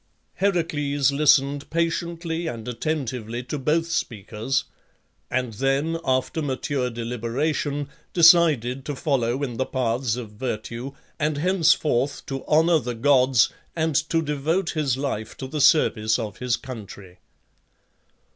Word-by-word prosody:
Heracles 145 Hz, -7 st, +1 dB
listened 140 Hz, -1 st, +3 dB
patiently 170 Hz, 0 st, -2 dB
and 115 Hz, -6 st, -6 dB
attentively 125 Hz, -3 st, -3 dB
to 145 Hz, +4 st, -4 dB
both 155 Hz, +5 st, +1 dB
speakers, 110 Hz, +2 st, -2 dB, 0.7 s
and 125 Hz, -2 st, -1 dB
then, 135 Hz, +8 st, 0 dB
after 130 Hz, +5 st, 0 dB
mature 135 Hz, -2 st, -1 dB
deliberation, 125 Hz, +5 st, -2 dB, 0.2 s
decided 155 Hz, -7 st, +5 dB
to 145 Hz, -, -3 dB
follow 130 Hz, -2 st, 0 dB
in 120 Hz, -4 st, -3 dB
the 130 Hz, -, 0 dB
paths 120 Hz, -2 st, 0 dB
of 120 Hz, -4 st, -7 dB
virtue, 115 Hz, +3 st, -5 dB, 0.3 s
and 150 Hz, -1 st, 0 dB
henceforth 155 Hz, -5 st, +2 dB
to 135 Hz, -1 st, -5 dB
honour 160 Hz, +2 st, +4 dB
the 125 Hz, -2 st, -4 dB
gods, 130 Hz, -1 st, +4 dB, 0.3 s
and 160 Hz, -1 st, 0 dB, 0.2 s
to 165 Hz, -1 st, +1 dB
devote 155 Hz, +5 st, -1 dB
his 145 Hz, -6 st, 0 dB
life 135 Hz, -6 st, -4 dB
to 135 Hz, -, -5 dB
the 145 Hz, +3 st, -3 dB
service 110 Hz, -7 st, +4 dB
of 110 Hz, -4 st, -5 dB
his 125 Hz, -1 st, 0 dB
country. 100 Hz, -7 st, -10 dB
135 Hz, 125 wpm, -24 LUFS, 120-155 Hz, 0.7 s, decided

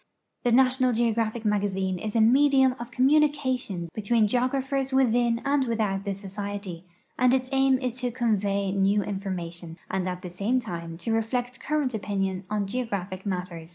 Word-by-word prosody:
The 245 Hz, -, +2 dB
X.\ti()Xal 255 Hz, 0 st, +3 dB, 0.2 s
Geogk.\phic 225 Hz, 0 st, -2 dB
]\I.\g.\zixe 195 Hz, -3 st, 0 dB
is 215 Hz, 0 st, -4 dB
a 225 Hz, -, +4 dB
medium 265 Hz, +3 st, +5 dB
of 235 Hz, 0 st, -6 dB
com 255 Hz, +1 st, +2 dB
munication 260 Hz, -, +1 dB
between 220 Hz, +1 st, +2 dB
geographers 265 Hz, +3 st, 0 dB
within 240 Hz, -2 st, +2 dB
and 280 Hz, -1 st, +2 dB
without 210 Hz, -4 st, -1 dB
the 200 Hz, -1 st, -2 dB
Society, 195 Hz, -2 st, -6 dB, 0.3 s
and 250 Hz, 0 st, +5 dB
its 255 Hz, -1 st, -2 dB
aim 270 Hz, -1 st, +3 dB
is 255 Hz, -2 st, -2 dB
to 250 Hz, -, 0 dB
convey 205 Hz, -5 st, 0 dB
new 200 Hz, +1 st, +2 dB
information 175 Hz, -4 st, -5 dB
and 185 Hz, -1 st, -1 dB
at 180 Hz, +1 st, -6 dB
the 180 Hz, -, -6 dB
same 205 Hz, +8 st, 0 dB
time 170 Hz, -7 st, -6 dB
to 225 Hz, +6 st, -2 dB
reflect 245 Hz, +2 st, -1 dB
current 295 Hz, -4 st, -1 dB
opinion 195 Hz, -3 st, -2 dB
on 210 Hz, -1 st, -1 dB
geographic 195 Hz, -4 st, -4 dB
matters. 180 Hz, -3 st, -4 dB
220 Hz, 160 wpm, -26 LUFS, 195-255 Hz, 0.3 s, medium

